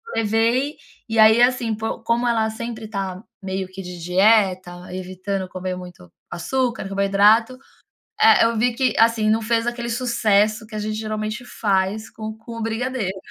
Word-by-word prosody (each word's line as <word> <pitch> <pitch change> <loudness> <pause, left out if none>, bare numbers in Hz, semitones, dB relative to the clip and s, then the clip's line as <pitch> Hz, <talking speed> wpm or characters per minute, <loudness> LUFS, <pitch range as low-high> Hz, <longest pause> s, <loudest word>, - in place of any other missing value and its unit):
levei 230 +6 +1 0.3
e 225 0 -1
aí, 220 +2 +7
assim, 245 -2 +2
por 220 +1 -5
como 235 +1 +1
ela 225 -2 +1
sempre 225 0 -6
tá 195 -2 -5 0.2
meio 190 -1 -4
que 185 +1 -9
de 180 -1 -8
dieta, 185 -1 +2
evitando 185 +1 -4
comer 185 0 -5
muito 180 - -11 0.2
açúcar, 245 +7 -2
carboidrato, 200 +5 +3 0.6
eh, 445 - +6
eu 230 0 +1
vi 240 +1 +1
que 260 +1 +1
assim, 225 -1 +3
não 220 +1 +2
fez 230 +1 +1
aquele 240 0 -3
sucesso 220 -3 +1
que 215 - -13
a - - -3
gente 215 +1 -3
geralmente 215 +2 -4
faz 205 -2 -1
com 215 0 -6
com 225 +2 -12
o - - -4
brigadeiro. 225 -3 -2
220 Hz, 160 wpm, -21 LUFS, 195-230 Hz, 0.6 s, aí